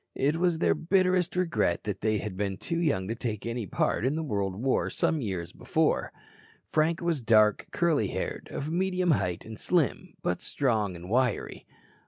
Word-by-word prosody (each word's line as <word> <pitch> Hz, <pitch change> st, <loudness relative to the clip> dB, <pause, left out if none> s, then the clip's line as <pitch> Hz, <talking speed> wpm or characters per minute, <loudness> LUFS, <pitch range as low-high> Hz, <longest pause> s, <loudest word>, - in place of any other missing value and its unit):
It 145 Hz, +4 st, +1 dB
was 175 Hz, -1 st, +2 dB
their -, -, +3 dB
bitterest 185 Hz, 0 st, +2 dB
regret 170 Hz, -, +1 dB
that 100 Hz, -2 st, -4 dB
they 110 Hz, 0 st, +2 dB
had 100 Hz, -1 st, -5 dB
been 100 Hz, -1 st, -2 dB
too 170 Hz, -, -2 dB
young 140 Hz, -, +1 dB
to 115 Hz, -, -1 dB
take 115 Hz, -3 st, -4 dB
any 115 Hz, -2 st, -3 dB
part -, -, 0 dB
in 135 Hz, +4 st, +1 dB
the 160 Hz, -, -2 dB
World 100 Hz, -9 st, -1 dB
War 130 Hz, +6 st, 0 dB
some 160 Hz, -3 st, 0 dB
years 95 Hz, -7 st, -3 dB
before. -, -, 0 dB, 0.6 s
Frank 160 Hz, +2 st, +2 dB
was 165 Hz, -5 st, 0 dB
dark, 110 Hz, -2 st, +4 dB
curly 160 Hz, -, +1 dB
haired, -, -, -4 dB
of 150 Hz, +3 st, -4 dB
medium 180 Hz, 0 st, +1 dB
height 90 Hz, -, 0 dB
and 110 Hz, -1 st, -9 dB
slim, 170 Hz, -6 st, 0 dB
but -, -, -1 dB
strong 110 Hz, -8 st, 0 dB
and 85 Hz, +1 st, -9 dB
wiry. 125 Hz, +1 st, 0 dB
125 Hz, 180 wpm, -28 LUFS, 105-165 Hz, 0.6 s, dark